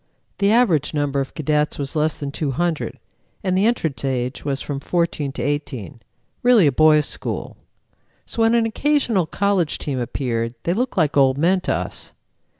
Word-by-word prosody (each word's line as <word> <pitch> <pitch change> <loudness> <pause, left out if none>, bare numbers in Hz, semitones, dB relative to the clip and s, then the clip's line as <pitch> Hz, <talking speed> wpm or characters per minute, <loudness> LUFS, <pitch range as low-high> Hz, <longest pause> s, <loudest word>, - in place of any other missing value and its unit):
The 200 +1 +3
average 180 - +3
number 145 -1 0
of 135 - -6
cadets 150 0 0
was 140 +2 -3
less 155 0 +1
than 140 -1 -5
200, 160 +3 -2 0.5
and 185 -2 +1
the 195 +4 +3
entrance 160 - -1
age 130 -1 -2
was 140 -1 -2
from 140 -2 -4
14 160 -2 -1
to 125 - -4
18 135 - -3 0.4
really 245 -7 +5
a 145 - +4
boys' 150 +1 +5
school. - - -4 0.7
So 230 - -4
when 225 +1 +4
an 230 -1 +3
occasional 230 - +1
college 195 -4 0
team 135 -3 -3
appeared, 115 -1 -2
they 170 - +1
looked 245 +2 -2
like 155 -4 +2
old 135 -1 +4
men 180 +5 +2
to - - 0
us. - - -5
150 Hz, 170 wpm, -21 LUFS, 140-190 Hz, 0.7 s, really